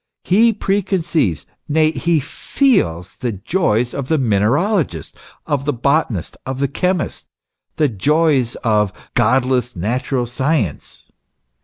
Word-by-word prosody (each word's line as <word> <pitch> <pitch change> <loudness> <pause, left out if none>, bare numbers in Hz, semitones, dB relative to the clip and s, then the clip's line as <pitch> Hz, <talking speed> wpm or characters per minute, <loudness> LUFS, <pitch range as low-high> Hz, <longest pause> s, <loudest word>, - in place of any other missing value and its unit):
He 225 +6 +4
preconceives, 180 - 0 0.2
nay, 155 +1 +3
he 170 0 +1
feels 130 - 0
the 120 -3 -3
joys 120 - 0
of 140 -2 -4
the 160 - +2
mineralogist, 125 - 0 0.3
of 140 -2 -1
the 145 - 0
botanist, 130 - 0
of 130 0 -5
the 140 - +1
chemist 180 +4 -2 0.5
the 155 - +2
joys 140 - +1
of 105 -3 +2
" - - -34
godless 125 +1 +1
Natural 120 +7 -1
science." 125 - -2
135 Hz, 120 wpm, -18 LUFS, 115-160 Hz, 0.5 s, He